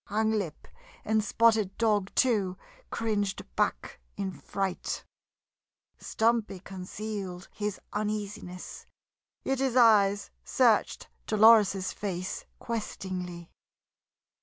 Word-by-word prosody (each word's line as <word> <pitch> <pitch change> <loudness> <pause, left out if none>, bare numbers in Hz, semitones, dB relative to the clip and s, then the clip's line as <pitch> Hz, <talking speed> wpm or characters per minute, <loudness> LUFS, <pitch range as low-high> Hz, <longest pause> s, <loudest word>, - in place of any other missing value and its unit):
Hanglip 210 -6 -1 0.4
and 220 0 +2
Spotted 220 -2 +3
Dog, 210 -4 +2
too, 200 -7 +2 0.3
cringed 205 -4 -1
back - - -1 0.2
in 195 -1 -2
fright. 190 +1 -3 0.9
Stumpy 220 -4 0
concealed 190 0 -6
his 210 -1 -3
uneasiness, 210 -3 -4 0.6
yet 270 -1 0
his 265 -2 0
eyes 205 -5 +5
searched - - +2 0.2
Dolores's 215 -3 +5
face 185 -2 -4
questingly. 185 -6 -5
205 Hz, 85 wpm, -29 LUFS, 190-220 Hz, 0.9 s, eyes